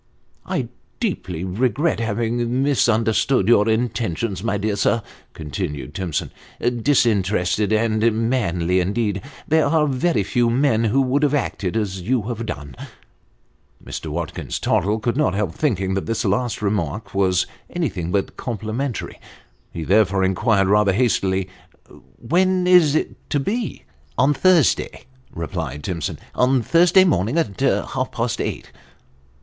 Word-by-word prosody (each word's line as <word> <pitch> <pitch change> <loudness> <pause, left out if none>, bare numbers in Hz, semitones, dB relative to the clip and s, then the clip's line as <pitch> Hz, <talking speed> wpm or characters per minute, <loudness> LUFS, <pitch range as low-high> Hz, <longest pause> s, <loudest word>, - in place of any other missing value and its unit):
" - - -39
I - - -2 0.3
deeply 90 -2 -3
regret 120 - 0
having 120 +3 -1
misunderstood 115 -4 +2
your 115 -2 +4
intentions, 110 -4 -1
my 115 -3 0
dear 105 +1 -1
sir," 115 +2 +1 0.3
continued 75 -3 -5
Timson. 90 -5 -3 0.2
" - - -26
Disinterested 105 -6 +1
and 110 0 +1 0.3
manly, 90 -7 +1
indeed! 100 +1 -1 0.3
There 160 0 +3
are 160 -2 +3
very 140 - +1
few 120 +4 +1
men 120 -2 +2
who 125 +6 +2
would 135 +3 +1
have 145 -1 +2
acted 110 -7 -2
as 95 -4 -2
you 120 +4 0
have 115 0 -4
done." 70 - -6 1.1
Mr. - - -6
Watkins - - -4
Tottle 105 +3 +1
could 120 +2 -1
not 150 -9 +1
help 100 -5 -1
thinking 95 - 0
that 95 - -2
this 115 +1 -1
last 110 +3 -1
remark 100 -1 -2
was 95 -2 +2 0.2
anything 100 - -3
but 100 0 -1
complimentary. 115 +3 -4 0.5
He 85 - -5
therefore 95 +1 +3
inquired, 95 +1 +2
rather 105 0 +3
hastily, 95 -4 +1 0.4
" - - -20
When 185 +4 +2
is 175 -5 +5
it - - -3
to 145 - +1
be? 215 - -3
" 70 - -34
" 70 - -35
On 135 +4 +4
Thursday," 175 -2 +2 0.3
replied 75 -3 -5
Timson, 85 -5 -3
" - - -37
on 125 -1 +2
Thursday 175 - +5
morning 125 - +1
at 105 - -1
half 130 -1 0
past 115 0 -2
eight." - - -4
110 Hz, 145 wpm, -21 LUFS, 95-130 Hz, 1.1 s, is